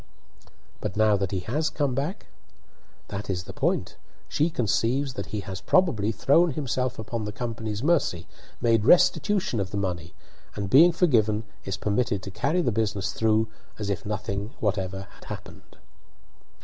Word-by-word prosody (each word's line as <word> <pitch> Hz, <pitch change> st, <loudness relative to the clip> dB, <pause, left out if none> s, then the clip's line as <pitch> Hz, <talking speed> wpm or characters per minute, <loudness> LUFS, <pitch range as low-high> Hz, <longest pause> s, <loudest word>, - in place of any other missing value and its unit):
"But 90 Hz, -, -4 dB
now 110 Hz, -1 st, +5 dB
that 100 Hz, -2 st, -1 dB
he 95 Hz, -1 st, -2 dB
has 150 Hz, -, -1 dB
come 145 Hz, -4 st, -1 dB
back?" 145 Hz, -, -3 dB, 0.8 s
"That 100 Hz, 0 st, -5 dB
is 90 Hz, -1 st, -1 dB
the -, -, -9 dB
point. -, -, -1 dB, 0.3 s
She 155 Hz, +3 st, +1 dB
conceives 125 Hz, +1 st, 0 dB
that 100 Hz, -6 st, -5 dB
he 105 Hz, 0 st, -3 dB
has 95 Hz, -1 st, -6 dB
probably 125 Hz, -, +2 dB
thrown 145 Hz, -, +3 dB
himself 130 Hz, -3 st, -1 dB
upon 110 Hz, 0 st, -4 dB
the 105 Hz, -, -3 dB
company's 110 Hz, -1 st, -4 dB
mercy, 145 Hz, -, +1 dB, 0.3 s
made 115 Hz, -3 st, +3 dB
restitution 180 Hz, -, +4 dB
of 95 Hz, -1 st, -1 dB
the 100 Hz, -, -4 dB
money, 90 Hz, -4 st, -3 dB, 0.4 s
and, 100 Hz, -2 st, -4 dB
being 165 Hz, +6 st, +8 dB
forgiven, 115 Hz, -, +2 dB, 0.2 s
is 95 Hz, -1 st, -3 dB
permitted 100 Hz, -1 st, 0 dB
to 95 Hz, -, -6 dB
carry 160 Hz, -, 0 dB
the 125 Hz, -, +1 dB
business 105 Hz, -4 st, -1 dB
through 110 Hz, 0 st, +2 dB, 0.3 s
as 100 Hz, -2 st, -2 dB
if 100 Hz, -, -3 dB
nothing 105 Hz, +3 st, -4 dB
whatever 95 Hz, -2 st, -1 dB
had -, -, -16 dB
happened." -, -, -10 dB
110 Hz, 160 wpm, -26 LUFS, 100-135 Hz, 0.8 s, being